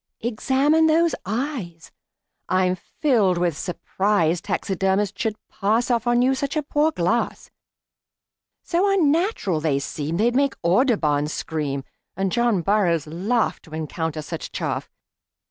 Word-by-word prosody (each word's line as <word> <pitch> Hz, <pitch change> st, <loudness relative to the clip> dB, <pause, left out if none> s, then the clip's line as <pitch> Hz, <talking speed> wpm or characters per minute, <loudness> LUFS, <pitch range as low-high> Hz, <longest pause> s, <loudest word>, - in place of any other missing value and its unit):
"Examine 270 Hz, +7 st, +2 dB
those 330 Hz, +1 st, +3 dB
eyes. 215 Hz, -, -4 dB, 0.6 s
I'm 185 Hz, 0 st, +2 dB
filled 215 Hz, -, +1 dB
with 170 Hz, -3 st, 0 dB
surprise 180 Hz, 0 st, 0 dB
Taxidermists 195 Hz, +1 st, -1 dB
should 220 Hz, -1 st, 0 dB
pass 225 Hz, +5 st, 0 dB
Off 235 Hz, 0 st, 0 dB
on 240 Hz, +1 st, +3 dB
you 260 Hz, +1 st, +3 dB
such 275 Hz, +3 st, -2 dB
poor 300 Hz, +2 st, +3 dB
glass; 230 Hz, -, -1 dB, 1.1 s
So 360 Hz, +4 st, +1 dB
unnatural 330 Hz, -, +1 dB
they 150 Hz, -3 st, +1 dB
seem 150 Hz, +3 st, -3 dB
They'd 235 Hz, +4 st, +2 dB
make 275 Hz, 0 st, +2 dB
Audubon 170 Hz, -, +2 dB
scream, 150 Hz, -3 st, -3 dB, 0.3 s
And 195 Hz, -1 st, -1 dB
John 235 Hz, -5 st, +1 dB
Burroughs 175 Hz, -6 st, +2 dB
laugh 195 Hz, +9 st, -1 dB
To 160 Hz, -2 st, -10 dB
encounter 160 Hz, 0 st, -3 dB
such -, -, -6 dB
chaff. -, -, -3 dB
205 Hz, 125 wpm, -23 LUFS, 170-260 Hz, 1.1 s, those